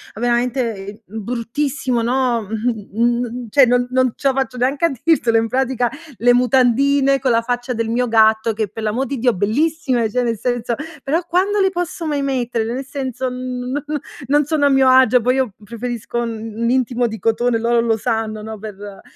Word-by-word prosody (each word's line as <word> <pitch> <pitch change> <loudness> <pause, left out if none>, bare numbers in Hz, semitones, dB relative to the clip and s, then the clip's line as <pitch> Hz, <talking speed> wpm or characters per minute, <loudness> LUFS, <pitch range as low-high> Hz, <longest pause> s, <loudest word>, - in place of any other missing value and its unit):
veramente, 240 +1 0
ehm, 205 +1 -9
bruttissimo, 245 - -2
no, 245 0 +1
mh, 220 0 -4
mhmm, 240 0 0
cioè, 275 +3 +6
non 245 0 +2
non 255 -2 +2
ce 275 - -1
la 265 - +1
faccio 255 -2 -2
neanche 270 +6 +1
a 335 - +2
dirtelo. 245 -9 +3
In 225 - +1
pratica 255 -1 0 0.3
le 245 +1 +4
mutandine 265 +3 +3
con 260 - 0
la 230 - +3
faccia 245 +1 -2
del 230 -1 -2
mio 245 +2 0
gatto 220 0 +3
che, 215 -1 -2
per 220 +3 -8
l'amor 230 +6 0
di 275 -2 -4
Dio, 245 0 +2
bellissime, 250 - 0
cioè 250 +3 0
nel 230 -3 -1
senso, 245 -1 -1 0.3
però 315 +5 0
quando 390 +4 +1
le 385 - +4
posso 350 -2 -4
mai 290 -2 -1
mettere? 265 -3 0 0.2
Nel 250 +4 -4
senso, 260 -2 -4
non 250 +2 -4 0.5
non 290 +1 +3
sono 295 -1 +1
a - - +5
mio 270 -1 +4
agio. 255 -2 +5
Poi 250 +2 +2
io 260 -6 0
preferisco 235 +1 -5
un 225 -1 -5
un 235 0 0
intimo 250 -1 +1
di 220 -1 -6
cotone, 230 +1 +1
loro 235 0 +2
lo 225 -1 +1
sanno, 220 -1 -2
no, 220 0 -7
per 205 -1 -9
245 Hz, 190 wpm, -19 LUFS, 225-265 Hz, 0.5 s, cioè